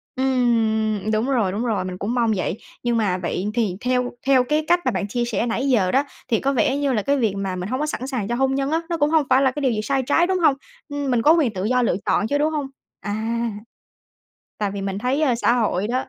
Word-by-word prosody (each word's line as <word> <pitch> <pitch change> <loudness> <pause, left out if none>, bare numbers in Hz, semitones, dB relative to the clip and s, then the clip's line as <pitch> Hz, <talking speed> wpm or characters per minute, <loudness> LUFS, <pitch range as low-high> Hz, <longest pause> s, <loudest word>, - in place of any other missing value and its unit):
Ừm, 225 -5 +1
đúng 220 +5 0
rồi, 225 -8 +1
đúng 215 +5 -2
rồi, 205 -5 -1
mình 185 -1 -5
cũng 215 +6 -3
mong 235 -3 +2
vậy. 185 +2 -2 0.3
Nhưng 240 -1 +1
mà 195 -5 +1
vậy 180 +2 -3
thì 215 -7 0
theo 250 0 0 0.2
theo 260 -2 +5
cái 300 +4 0
cách 350 +1 +4
mà 255 - +2
bạn 205 - -2
chia 240 +3 -1
sẻ 230 0 -1
nãy 245 +4 -1
giờ 195 -7 +2
đó, 275 +2 +3 0.2
thì 225 - +1
có 275 +1 0
vẻ 265 +3 +1
như 280 -2 0
là 215 - +1
cái 280 +6 +1
việc 220 -6 +1
mà 195 -2 -3
mình 180 +3 -5
hông 255 +2 -2
có 300 - 0
sẵn 265 -3 -4
sàng 240 -8 -3
cho 240 - -1
hôn 270 +1 +1
nhân 275 +2 -1
á, 325 +1 +1
nó 335 - -1
cũng 290 0 +2
hông 315 -3 +3
phải 260 +1 +5
là 265 -2 +3
cái 290 - -5
điều 260 -3 +2
gì 215 -1 -1
sai 270 +3 0
trái, 330 +6 +2
đúng 375 -1 0
hông? 295 -5 +4 0.3
Ừm, 285 -2 -2
mình 235 -2 +2
có 310 +5 +6
quyền 285 -10 +2
tự 185 0 -4
do 250 +3 +2
lựa 230 - +1
chọn 215 - +1
chứ, 285 - +1
đúng 305 +2 +1
hông? 290 -3 -2 0.3
À. 205 - -4 1.5
Tại 205 -2 -1
vì 200 0 -5
mình 195 0 -3
thấy, 260 +7 0
ơ, 255 -5 +3
xã 235 0 +2
hội 210 -4 0
đó 255 +2 -1
245 Hz, 270 wpm, -22 LUFS, 215-275 Hz, 1.5 s, có